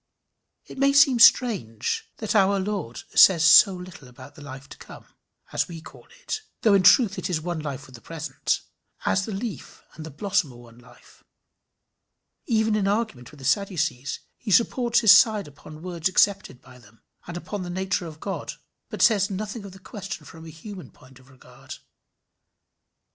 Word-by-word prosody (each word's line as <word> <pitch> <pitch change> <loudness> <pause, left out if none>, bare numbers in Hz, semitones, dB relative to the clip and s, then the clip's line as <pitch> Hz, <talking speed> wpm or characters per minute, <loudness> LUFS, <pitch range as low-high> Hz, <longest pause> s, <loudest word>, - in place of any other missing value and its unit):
It - - -11
may 275 0 +3
seem 280 -3 +5
strange 195 - +3
that 220 - -3
our 200 -1 +3
Lord 190 - -5
says 170 -4 +6
so 185 +3 +7
little 180 -6 -11
about 130 +3 -14
the 150 - -15
life 135 -1 -10
to - - -12
come - - -13 0.5
as - - 0
we 170 -2 -9
call - - -15 0.2
it 440 -3 -4 0.2
though 215 - +4
in 195 - +4
truth 195 +2 +4
it - - -4
is 170 -4 -1
one 170 +1 -4
life 140 -4 -6
with 130 - -17
the 120 - -13
present 150 -4 -3 0.4
as 190 0 +1
the - - -5
leaf 210 +1 -7
and 160 - -10
the 160 - -8
blossom 180 -2 -2
are - - -16
one 120 -1 -16
life. 120 0 -20 1.2
Even 220 -2 +1
in 200 -2 0
argument 200 - -2
with 150 - -16
the 135 - -11
Sadducees 165 -6 -1 0.2
he 230 - -8
supports 240 +3 +2
his 220 -4 +7
side 210 -1 +5
upon 155 +2 -14
words 175 -1 -2
accepted 195 -8 0
by 130 -1 -16
them, 115 -1 -22 0.2
and 175 0 -6
upon 205 +3 -6
the 180 - -6
nature 185 -1 -2
of 155 -1 -11
God, 195 +2 -5 0.4
but - - -2
says 205 -4 +3
nothing 205 +2 -6
of 195 - -10
the 190 - -14
question 195 -5 -9
from 160 +2 -13
a - - -9
human 185 +4 -11
point 130 0 -20
of 130 0 -22
regard. 130 -1 -13
180 Hz, 185 wpm, -24 LUFS, 145-205 Hz, 1.2 s, so